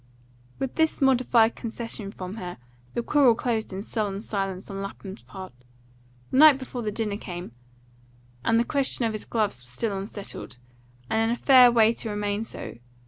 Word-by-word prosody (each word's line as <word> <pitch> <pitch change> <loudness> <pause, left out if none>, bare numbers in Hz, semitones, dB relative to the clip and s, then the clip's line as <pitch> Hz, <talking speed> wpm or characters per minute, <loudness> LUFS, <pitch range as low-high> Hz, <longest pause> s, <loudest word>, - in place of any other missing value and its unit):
With 270 -1 -4
this 320 -1 +2
modified 250 -4 +4
concession 225 -3 -4
from 185 +1 -7
her, 180 -3 -6 0.4
the 235 - -1
quarrel 270 -3 +4
closed 225 -3 -1
in 190 +1 -5
sullen 205 -2 -2
silence 195 -3 -3
on 195 0 -5
Lapham's 195 0 -8
part. 190 -6 -10 0.8
The - - +1
night 300 -1 +8
before 260 -2 -6
the 215 - -2
dinner 210 -1 -2
came, 175 - -7 0.9
and 230 - +3
the - - +3
question 270 -3 +1
of 225 - -1
his 215 - -5
gloves 210 - -1
was 125 0 -14
still 200 - -2
unsettled, 195 - -7 0.5
and 220 - +1
in 225 - +2
a 235 - +1
fair 255 -2 +7
way 225 -1 +5
to 230 - -5
remain 205 0 -2
so. 170 - -8
220 Hz, 175 wpm, -26 LUFS, 195-240 Hz, 0.9 s, night